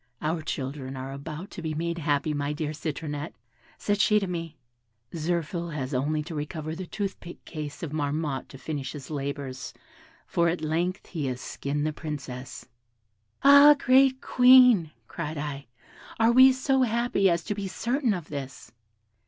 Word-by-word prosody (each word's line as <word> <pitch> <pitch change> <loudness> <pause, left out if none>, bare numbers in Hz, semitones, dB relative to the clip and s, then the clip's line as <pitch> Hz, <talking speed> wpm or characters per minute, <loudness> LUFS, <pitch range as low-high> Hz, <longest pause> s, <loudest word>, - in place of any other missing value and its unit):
'Our 160 +2 -1
children 135 -2 -5
are 130 +1 -5
about 155 +7 -7
to - - -7
be 160 -2 -3
made 170 +2 -2
happy, 145 0 0
my 145 0 -2
dear 150 0 -3
Citronette,' 150 0 -5 0.4
said 205 -1 0
she 210 +1 +4
to 200 - -2
me; 165 -3 -5 0.6
'Zirphil 170 0 -2
has 135 -1 -4
only 150 +4 0
to 165 +2 -8
recover 155 +1 -4
the 180 +2 -6
toothpick 195 -4 -6
case 150 -1 -7
of 160 - -4
Marmotte 145 -2 -2
to 135 - -11
finish 140 -1 -5
his 145 0 -9
labours, 140 -2 -5 0.5
for 170 0 +1
at 170 -1 -2
length 170 +4 -1
he 155 -6 -3
has 125 -1 -3
skinned 145 +3 -3
the 155 - -1
Princess.' 135 -5 -7 0.8
'Ah! 285 +1 +9
great 265 -1 +4
Queen,' 250 -8 +6 0.2
cried 155 -2 -5
I, 145 -3 -5 0.5
'are 225 +1 +5
we 260 +2 +8
so 265 +1 +1
happy 235 -4 +2
as 170 -1 0
to 210 - -2
be 200 -1 -4
certain 240 +3 0
of 175 -4 -7
this?' 135 -3 -7
155 Hz, 160 wpm, -27 LUFS, 145-195 Hz, 0.8 s, Ah